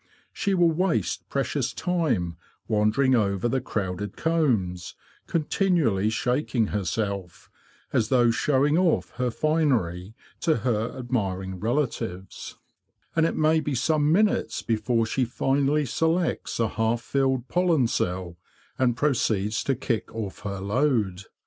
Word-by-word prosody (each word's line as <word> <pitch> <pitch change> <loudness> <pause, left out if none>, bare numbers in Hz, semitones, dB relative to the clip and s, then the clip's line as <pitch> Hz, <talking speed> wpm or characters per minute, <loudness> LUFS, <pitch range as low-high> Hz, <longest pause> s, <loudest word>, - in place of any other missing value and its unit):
She 200 -3 0
will 175 -2 +4
waste 175 +2 -1
precious 135 -1 -1
time 155 - 0 0.3
wandering 110 +5 +2
over 100 -2 +1
the 130 +2 0
crowded 100 -4 -4
combs, 120 - 0 0.3
continually 155 - +1
shaking 125 0 0
herself, 100 -2 -3 0.4
as 110 - +1
though 120 -3 +4
showing 140 +7 +2
off 180 -3 +1
her 125 0 0
finery 115 - 0 0.2
to 160 -3 +2
her 115 -1 0
admiring 95 -7 -2
relatives; 110 -6 -3 0.6
and 165 -1 +4
it - - -3
may 155 +1 +3
be 150 -3 -2
some 150 +3 +2
minutes 210 +5 +1
before 115 +1 +1
she 130 +4 0
finally 140 +4 +1
selects 165 +5 0
a 115 - +2
half 115 +2 0
filled 130 0 0
pollen 170 -3 +2
cell 90 -5 -2 0.4
and 120 -2 +2
proceeds 110 -7 +1
to 135 - +1
kick 120 -2 -2
off 105 -4 -5
her 100 -1 -5
load. 100 -3 0
120 Hz, 125 wpm, -25 LUFS, 105-150 Hz, 0.6 s, will